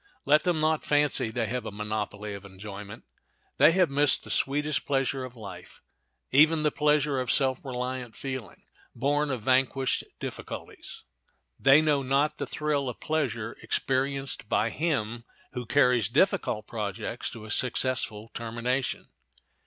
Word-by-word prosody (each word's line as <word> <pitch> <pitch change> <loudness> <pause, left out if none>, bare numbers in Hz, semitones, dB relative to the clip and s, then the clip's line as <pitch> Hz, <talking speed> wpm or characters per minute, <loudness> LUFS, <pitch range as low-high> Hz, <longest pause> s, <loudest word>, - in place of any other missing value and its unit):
Let 150 +2 +5
them 175 -2 +1
not 155 0 +1
fancy 145 -5 +2
they 115 0 -1
have 120 +2 -3
a 110 - -5
monopoly 105 0 -4
of 100 -1 -8
enjoyment. 100 +1 -9 0.5
They 155 - +7
have 180 -4 +3
missed 145 0 +3
the - - -7
sweetest 150 +2 +1
pleasure 135 -1 0
of 130 -1 -8
life, 95 -6 -10 0.5
even 155 +3 +5
the 150 - +3
pleasure 150 -2 +2
of 125 -1 0
self 130 -1 +2
reliant 125 -2 -4
feeling, 130 -7 -6 0.3
born 145 +4 +1
of 130 -5 -3
vanquished 130 +1 +2 0.2
difficulties. - - -7 0.6
They 140 +3 +6
know 150 -3 +2
not 135 +3 +1
the 140 - -3
thrill 145 -2 -1
of 120 - -7
pleasure 120 -8 -2
experienced 135 -3 -1
by 115 - +2
him 120 -8 -1 0.3
who 125 -3 -5
carries 125 -5 +3
difficult 150 - +1
projects 110 +1 -4
to 110 -2 -9
a 110 - -7
successful 120 -2 0
termination. 120 +3 -2
130 Hz, 145 wpm, -28 LUFS, 115-145 Hz, 0.6 s, They